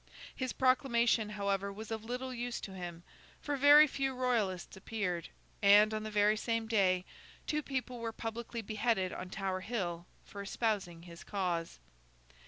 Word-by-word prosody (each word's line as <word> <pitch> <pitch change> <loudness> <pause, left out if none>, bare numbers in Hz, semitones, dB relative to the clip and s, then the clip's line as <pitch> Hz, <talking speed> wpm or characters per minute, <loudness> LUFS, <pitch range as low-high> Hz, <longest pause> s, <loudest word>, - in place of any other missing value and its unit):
His 255 -2 -2
proclamation, 240 -4 +2
however, 200 -1 -1
was 215 +2 -8
of 220 -1 -3
little 250 +3 -4
use 245 0 -3
to 195 - -7
him, 175 -2 -7 0.4
for 290 - -2
very 290 +2 +8
few 270 -2 -2
Royalists 225 -8 -1
appeared; 190 -3 -3 0.3
and, 205 +2 +7
on 215 - -1
the 215 - -5
very 210 0 +3
same 230 +1 -1
day, 190 -5 +2 0.4
two 300 0 0
people 255 -3 -4
were 230 -1 -3
publicly 230 +1 -5
beheaded 215 -3 0
on 185 - -6
Tower 190 -1 -2
Hill 180 -6 -3 0.2
for 200 - -8
espousing 195 -5 -2
his 170 -1 -11
cause. 180 -5 -2
215 Hz, 155 wpm, -33 LUFS, 190-240 Hz, 0.4 s, very